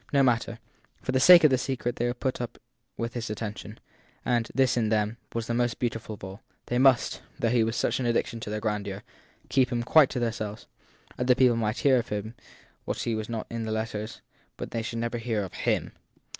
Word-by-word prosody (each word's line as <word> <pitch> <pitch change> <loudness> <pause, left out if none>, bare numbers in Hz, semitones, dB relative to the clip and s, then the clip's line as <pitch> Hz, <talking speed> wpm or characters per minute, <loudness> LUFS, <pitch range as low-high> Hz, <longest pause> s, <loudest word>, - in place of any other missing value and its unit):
No 140 -1 +4
matter; 115 -2 +1 0.5
for - - -1
the 130 - +2
sake 175 +5 +9
of 155 - +6
the 130 - +3
secret 125 -2 -2
they 120 - 0
would 120 +1 -3
put 130 -2 -1
up 120 - -5 0.4
with 115 0 -3
his 120 -2 -4
attention; 105 +1 -6 0.5
and 120 -2 +1
this, 130 -2 +3
in 115 -3 +1
them, 105 +1 0
was 115 0 -3
most 120 0 0
beau 120 - +1
tiful 110 -1 -7
of - - -19
all 95 +2 -8 0.2
they 120 - 0
must, 130 -2 +4 0.2
though 115 - +1
he 120 -2 +4
was 115 +1 -1
such - - 0
an 125 - 0
addition 115 0 0
to 110 - -6
their 105 0 -2
grandeur, 105 -2 -3 0.5
keep 130 -2 +3
him 120 -1 0
quite 145 +2 +6
to 130 - -3
themselves. 110 -2 -3 0.5
Other 125 0 +4
people 125 -2 +4
might 110 -1 -1
hear 135 -2 +4
of 120 - -5 0.8
what - - -3
was 110 -2 -2 0.2
in 115 -1 -3
the 110 - -3
letters, 110 -1 -4 0.4
but - - -6
they 115 - -2
should 115 +1 -4
never 115 +1 -2
hear 110 -3 -1
of 95 - -8
him. - - -1
115 Hz, 210 wpm, -27 LUFS, 110-125 Hz, 0.8 s, sake